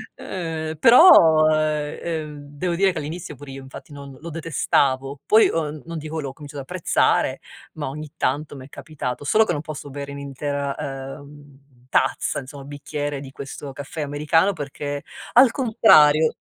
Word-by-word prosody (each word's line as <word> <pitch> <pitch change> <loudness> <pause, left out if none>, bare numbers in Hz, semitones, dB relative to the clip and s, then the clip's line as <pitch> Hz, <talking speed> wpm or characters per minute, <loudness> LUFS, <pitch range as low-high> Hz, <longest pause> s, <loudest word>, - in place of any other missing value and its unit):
Però, 160 - +5
eh, 150 -1 -1
ehm, 155 -3 -4 0.2
devo 175 +2 -1
dire 195 +2 +3
che, 180 - -7
all'inizio, 155 0 -6
pure 135 +1 -11
io, 135 0 -9
infatti, 135 +3 -12
non 140 -2 -10
lo 170 - -8
detestavo. 140 -4 0
Poi, 220 +1 +6
ehm, 155 -3 -3
non 170 0 -6
dico 155 +1 -5
l'ho 135 -2 -5
cominciato 145 -1 -9
ad 135 - -13
apprezzare, 180 -2 +1 0.3
ma - - -5
ogni 150 +2 -7
tanto 145 +1 -2
m'è 130 0 -10
capitato. 140 -3 -6
Solo 215 +10 +3
che 175 - -1
non 150 - -3
posso 150 -2 -8
bere 140 0 -7
un'intera 140 0 -4
ehm, 140 -1 -10
tazza, - - 0
insomma, 140 0 -10
bicchiere 145 0 -5
di 135 -1 -10
questo 140 +1 -8
caffè 145 +3 -7
americano 150 +6 +1
perché, 145 -3 -5 0.3
al 250 -1 +7
contrario, 160 - +5
145 Hz, 155 wpm, -22 LUFS, 140-160 Hz, 0.3 s, al